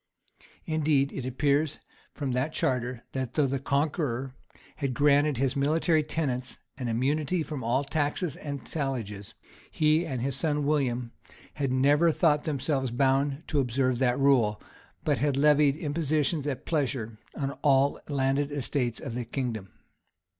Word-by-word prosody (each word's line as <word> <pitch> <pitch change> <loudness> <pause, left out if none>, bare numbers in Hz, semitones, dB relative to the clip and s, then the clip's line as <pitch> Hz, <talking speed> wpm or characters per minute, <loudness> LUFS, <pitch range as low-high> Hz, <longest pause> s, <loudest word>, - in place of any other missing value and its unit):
Indeed, 150 -3 +2
it 130 -2 -4
appears 145 +3 +1 0.4
from 140 -3 -2
that 130 +5 -1
charter, 125 -2 -1
that 130 -2 -4
though 150 - +3
the 135 0 -1
Conqueror 140 -2 -1 0.4
had 135 -4 -2
granted 145 0 +3
his 135 0 0
military 155 +3 +2
tenants 135 -5 -2 0.2
an 130 -2 -4
immunity 145 +8 0
from 150 -5 -5
all 125 +5 +1
taxes 150 +2 -1
and 140 -2 -6
talliages, 115 -9 -4 0.3
he 155 +2 +2
and 130 -5 -3
his 135 -1 -1
son 150 -1 0
William 125 -5 0 0.4
had 140 -3 -1
never 145 +6 +4
thought 150 -2 +2
themselves 140 -3 0
bound 135 +4 +1
to 150 - 0
observe 130 -1 +1
that 125 -2 +2
rule, 125 -7 +3 0.4
but 145 -5 +1
had 140 0 +1
levied 145 -1 +4
impositions 150 -1 0
at 135 -3 -3
pleasure 130 -8 -2 0.2
on 140 -2 -2
all 140 -1 +3
the 145 - -4
landed 135 +2 +1
estates 130 -4 -1
of - - -6
the 125 +1 -3
kingdom. 115 -5 -4
140 Hz, 145 wpm, -28 LUFS, 130-150 Hz, 0.4 s, never